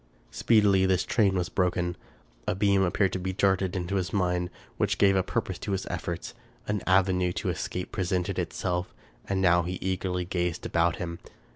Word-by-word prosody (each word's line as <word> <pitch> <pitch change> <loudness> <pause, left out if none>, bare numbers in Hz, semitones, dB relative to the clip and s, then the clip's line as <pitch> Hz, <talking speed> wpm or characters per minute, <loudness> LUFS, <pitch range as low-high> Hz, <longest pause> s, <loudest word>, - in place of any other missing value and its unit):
Speedily 100 -4 +4
this 95 -1 +2
train 100 -5 +2
was 90 -1 0
broken. 90 -1 0 0.5
A - - +1
beam 100 0 +3
appeared 95 +1 +2
to 95 - -1
be 95 +1 -3
darted 95 -2 +1
into 90 +2 -1
his 90 -1 -2
mind 90 -2 0 0.3
which - - +1
gave 100 -1 +5
a 95 - +4
purpose - - -3
to 100 - -3
his 95 - -2
efforts. - - -4 0.3
An 105 -2 -1
avenue 90 -1 +3
to 95 - -2
escape 90 +1 -4
presented 90 -2 -1
itself; 90 0 -2 0.3
and 95 -1 0
now 90 -1 +5
he 90 +2 -3
eagerly 95 -1 -2
gazed 90 -2 -2
about 85 0 +2
him. 85 0 -5
95 Hz, 175 wpm, -27 LUFS, 90-95 Hz, 0.5 s, gave